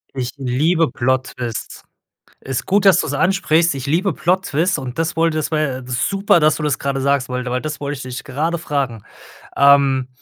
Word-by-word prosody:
Ich 125 -2 -3
liebe 150 +6 +1
Plot 130 +1 0
Twists. 120 -3 -6 0.6
Ist 130 -1 -4
gut, 200 +1 +2
dass 190 -2 +6
du's 140 - -3
ansprichst, 165 0 +2
ich 135 0 -5
liebe 175 +7 +1
Plot 185 +2 0
Twists 160 +5 +1
und 130 0 -7
das 165 +1 -1
wollte 165 -1 +1
das, 155 - -2
war, 155 - +1
ja, 135 -4 -1
äh, - - -9
super, 175 +10 +1
dass 155 0 +3
du - - -5
das 150 -3 0
gerade 140 -1 -2
sagst 140 -1 +1
weil 125 0 -3
da 125 - -4
weil 125 - 0
das 155 -1 -4
wollte, 145 0 -3
ich 135 - -8
dich 125 0 -7
gerade 155 +5 -2
fragen. 140 -8 -3 0.5
Ähm, 140 -2 +4
140 Hz, 210 wpm, -19 LUFS, 130-165 Hz, 0.6 s, dass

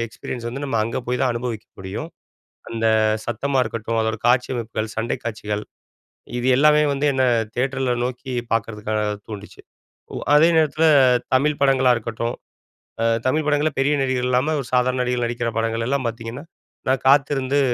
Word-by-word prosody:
Experience 115 +1 -7
வந்து, 135 +4 -6
நம்ம 130 - -1
அங்க 115 +4 -3
போய் 125 +1 -1
தான் 125 - +2
அனுபவிக்க 120 -2 -4
முடியும். 95 +12 -5 0.6
அந்த 115 0 -1 0.4
சத்தமா 135 +3 -1
இருக்கட்டும். 115 0 -3
அதோட 110 0 -1
காட்சி 125 +1 +3
அமைப்புகள், 110 -2 -3
சண்டை 110 +1 -1
காட்சிகள் 105 -2 -3 0.8
இது 120 - -2
எல்லாமே 150 +2 +5
வந்து, 140 +1 -2
என்ன 130 -1 +2 0.3
தியேட்டரில 130 0 0
நோக்கி 130 +1 -5 0.2
பாக்கறதுக்காக 110 -1 -1 0.3
தூண்டுச்சு. 105 -1 -9 0.6
உ - - -3 0.2
அதே 160 +3 +6
நேரத்தில 155 0 +2 0.5
தமிழ் 145 +3 +2
படங்களா 130 -2 +4
இருக்கட்டும். 115 +1 -4 0.7
அ - - +2 0.2
தமிழ் 155 +4 +1
படங்கள்ல, 150 0 +1
பெரிய 140 +2 +3
நடிகர் 130 -1 0
இல்லாம 130 +5 +1
ஒரு 125 - -9
சாதாரண 125 +1 +2
நடிகர்கள் 125 -1 0
நடிக்கிற 120 0 -2
படங்கள் 115 0 -1
எல்லாம் 135 -3 0
பாத்தீங்கன்னா, 115 +5 -8 0.4
நான் 130 0 +1
காத்திருந்து, 140 0 +3
125 Hz, 150 wpm, -22 LUFS, 115-135 Hz, 0.8 s, அதே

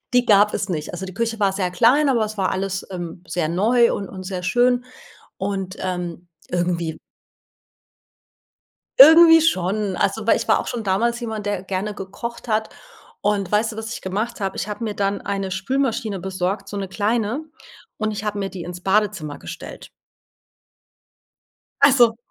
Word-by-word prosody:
Die 245 0 +5
gab 210 -2 +4
es 205 - -2
nicht. 155 -4 -3
Also, 175 +2 -5
die 185 - -7
Küche 230 +2 -2
war 200 -2 +3
sehr 190 -2 -1
klein, 250 +10 +4
aber 235 -5 +2
es 215 0 -7
war 190 - +1
alles, 190 0 -3
ähm, 175 -2 -6
sehr 160 -1 -1
neu 230 +8 +3
und 195 - -4
und 185 - -8
sehr 185 -1 -5
schön 245 +6 +2 0.5
und, 195 -1 -3
ähm, 180 -2 -4 0.2
irgendwie 175 -2 -1 2.0
Irgendwie 325 +3 +9
schon. 200 - 0
Also, 210 +4 -1
weil - - +5
ich - - -3
war - - +4
auch - - -7
schon 235 -3 -4
damals 230 +5 +1
jemand, 220 -3 -5
der, 205 -2 -1
äh, - - -13
gerne 195 +2 -3
gekocht 235 +6 -7
hat 220 0 0 0.5
und, 200 -2 0
weißt 220 +2 +1
du, - - -9
was 220 0 -5
ich - - -7
gemacht 210 +5 -3
habe? 195 -1 -2
Ich 205 - -3
habe 210 +3 -4
mir 215 -2 -3
dann 200 0 -1
eine 195 -1 -3
Spülmaschine 220 0 -1
besorgt, 190 +2 -3
so 205 - -6
'ne 195 -1 -3
kleine, 220 +7 -1 0.5
und 215 0 -1
ich 210 0 -5
habe 210 -1 -2
mir 195 -1 -3
die 185 -2 -7
ins 175 +1 -8
Badezimmer 195 -6 0
gestellt. - - -9 2.0
Ach 280 - +7
so. 235 -4 +5
200 Hz, 180 wpm, -22 LUFS, 190-225 Hz, 2.0 s, Irgendwie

